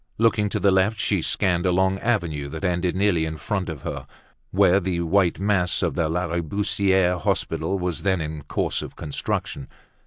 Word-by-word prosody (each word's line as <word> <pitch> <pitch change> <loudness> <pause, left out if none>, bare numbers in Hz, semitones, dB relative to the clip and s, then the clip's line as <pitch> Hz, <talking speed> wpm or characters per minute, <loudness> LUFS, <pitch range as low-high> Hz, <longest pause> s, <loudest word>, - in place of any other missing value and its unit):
Looking 110 -2 +2
to - - -2
the 100 - +3
left, 95 +3 +2
she - - +1
scanned 90 -1 +1
a - - +3
long 95 +2 +2
avenue 85 -12 -1
that 70 - -7
ended 90 -1 0
nearly 95 -4 +2
in 80 0 -3
front 95 0 -3
of 75 -4 -7
her, - - -5 0.4
where 95 -1 +4
the 90 -2 -2
white 90 0 +2
mass 95 -2 +1
of 85 -5 0
the 80 -1 0
Lariboisiere 90 +2 +1
Hospital 95 +3 -1
was 90 -3 -3
then 95 -2 +1
in 75 -1 -4
course - - -1
of - - -8
construction. 70 -1 -3
90 Hz, 180 wpm, -23 LUFS, 85-100 Hz, 0.4 s, where